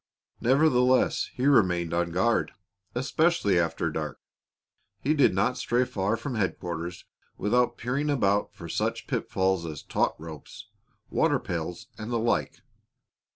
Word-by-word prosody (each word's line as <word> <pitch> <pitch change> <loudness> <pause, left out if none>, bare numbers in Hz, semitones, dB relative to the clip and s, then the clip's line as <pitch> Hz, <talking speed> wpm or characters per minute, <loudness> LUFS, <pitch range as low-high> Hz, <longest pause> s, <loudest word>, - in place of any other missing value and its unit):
Nevertheless, 130 -1 +3
he 130 - -3
remained 90 - +3
on 85 0 +1
guard, 105 +7 +1 0.4
especially 130 - +2
after 85 -1 0
dark. 75 -1 -4 0.8
He 150 - +1
did 145 -3 +4
not 125 +6 +1
stray 125 +1 +1
far 110 -3 -1
from 130 +4 -5
headquarters 90 -5 -3 0.3
without 125 +5 +1
peering 135 +5 -1
about 100 -8 +1
for - - -10
such - - -2
pitfalls 95 -2 0
as 75 -2 -7
taut - - 0
ropes, 80 -2 -10 0.5
water - - +3
pails, 85 0 -4
and 110 +2 -5
the 120 - +1
like. 115 +1 -1
110 Hz, 130 wpm, -27 LUFS, 85-125 Hz, 0.8 s, did